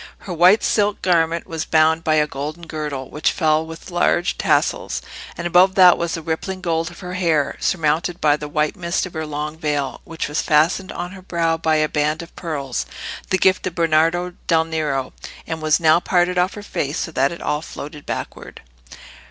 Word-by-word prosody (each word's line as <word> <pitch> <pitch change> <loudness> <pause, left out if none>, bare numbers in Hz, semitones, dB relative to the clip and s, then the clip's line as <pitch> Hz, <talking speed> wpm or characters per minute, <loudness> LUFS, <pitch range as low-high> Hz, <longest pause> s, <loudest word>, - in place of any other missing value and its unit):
Her 185 - -4
white 180 +5 +5
silk 205 -1 +1
garment 170 -2 +2
was 160 -1 -4
bound 160 +1 +3
by 155 -1 +2
a 150 -1 +3
golden 150 +4 -6
girdle, 150 -5 -5
which 150 - +1
fell 155 -2 +2
with 165 +3 -10
large 175 +1 +1
tassels; - - 0 0.4
and 170 - -5
above 180 +2 +4
that 180 -2 +8
was 170 0 -2
the 165 - -6
rippling 165 +4 -3
gold 165 -2 -1
of 175 - -13
her 180 -1 -6
hair, 165 -6 +1
surmounted 165 0 0
by 150 -1 +4
the 150 0 -6
white 150 +3 0
mist 175 -1 -1
of 185 - -9
her 160 -1 -4
long 150 +1 -4
veil, 145 -4 -2
which 165 -1 -5
was 150 +1 -1
fastened 165 +5 +2
on 175 - -5
her 190 -1 -11
brow 170 -3 0
by 160 -1 +1
a 155 0 +2
band 150 +2 -1
of 170 - -15
pearls, 140 -7 -4 0.4
the 190 - +2
gift 185 0 +2
of 175 - -5
Bernardo 165 +2 +2
del 160 -1 +3
Nero, 150 -5 -2 0.3
and 160 -1 -5
was 155 +1 +3
now 160 0 +5
parted 180 0 +1
off 180 +2 +1
her 205 - -8
face 145 -5 -3
so 160 - -3
that 135 -2 +1
it 170 - -7
all 150 - -1
floated 150 -2 -9
backward. - - -6
165 Hz, 200 wpm, -21 LUFS, 155-175 Hz, 0.4 s, that